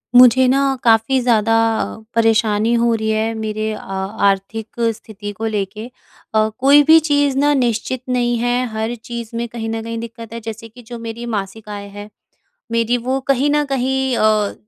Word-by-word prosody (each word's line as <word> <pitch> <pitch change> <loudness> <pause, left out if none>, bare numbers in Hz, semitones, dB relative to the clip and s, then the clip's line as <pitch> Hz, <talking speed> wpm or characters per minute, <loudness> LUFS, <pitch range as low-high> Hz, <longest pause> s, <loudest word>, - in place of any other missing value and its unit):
मुझे 250 +1 +7
ना 270 +2 +3 0.2
काफ़ी 225 +3 +3
ज़्यादा 225 -2 +2 0.6
परेशानी 225 0 +2
हो 235 0 +2
रही 220 0 -2
है 220 +1 0
मेरे 215 0 -3
अ, - - -7
आर्थिक 195 +3 -2 0.2
स्थिति 205 -1 -9
को 215 +2 -6
लेके। 210 0 -3 0.5
अ, 215 0 +3
कोई 280 +3 +6
भी 320 +2 +7
चीज़ 285 -3 +1
ना 290 +1 +3
निश्चित 245 -1 -1
नहीं 240 -1 +1
है, 245 +1 0
हर 220 +2 -2
चीज़ 235 0 -8
में 235 0 -2
कहीं 225 -1 -5
न 225 0 -3
कहीं 230 0 -5
दिक्कत 230 0 -9
है 230 - -5
जैसे 225 0 -8
कि 245 +3 -15
जो 235 +1 -9
मेरी 230 +1 -6
मासिक 215 -1 -5
आय 205 -1 -6
है, 205 +1 -10 0.6
मेरी 230 +1 +1
वो 255 +3 -2
कहीं 275 +2 +3
न 295 0 +2
कहीं 265 -1 0
अ, 215 -1 +2
230 Hz, 175 wpm, -18 LUFS, 215-245 Hz, 0.6 s, मुझे